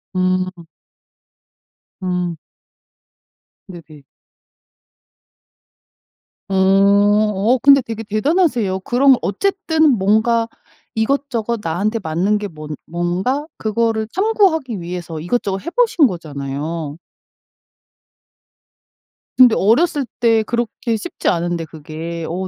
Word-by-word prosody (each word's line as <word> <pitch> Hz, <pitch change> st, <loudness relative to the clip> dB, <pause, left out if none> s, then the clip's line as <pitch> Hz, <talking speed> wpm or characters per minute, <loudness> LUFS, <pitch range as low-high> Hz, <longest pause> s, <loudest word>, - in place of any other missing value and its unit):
음. 185 Hz, -1 st, -1 dB, 1.4 s
음. 180 Hz, -2 st, -2 dB, 1.3 s
네네. 160 Hz, -5 st, -13 dB, 2.4 s
어. 195 Hz, -, -2 dB
어 200 Hz, +3 st, +3 dB
근데 275 Hz, -1 st, +7 dB
되게 225 Hz, -2 st, -6 dB
대단하세요. 225 Hz, -, +1 dB
그럼 260 Hz, +6 st, +4 dB
어쨌든 320 Hz, -, +1 dB
뭔가 220 Hz, +4 st, +2 dB, 0.5 s
이것저것 235 Hz, -2 st, -1 dB
나한테 205 Hz, +7 st, -1 dB
맞는 185 Hz, +4 st, 0 dB
게 205 Hz, 0 st, -4 dB
뭔 155 Hz, -3 st, -8 dB
뭔가 180 Hz, -, -2 dB
그거를 220 Hz, 0 st, -1 dB
탐구하기 370 Hz, -, +1 dB
위해서 170 Hz, -2 st, -6 dB
이것저것 195 Hz, +2 st, -2 dB
해보신 350 Hz, -, +3 dB
거잖아요. 150 Hz, -2 st, -5 dB, 2.4 s
근데 250 Hz, -3 st, +7 dB
어렸을 280 Hz, -, +2 dB
때 225 Hz, -2 st, +3 dB
그렇게 235 Hz, 0 st, -2 dB
쉽지 -, -, -6 dB
않은데 170 Hz, -1 st, -1 dB
그게 160 Hz, +2 st, -7 dB
어 185 Hz, +3 st, -3 dB
205 Hz, 195 characters per minute, -18 LUFS, 175-240 Hz, 2.4 s, 근데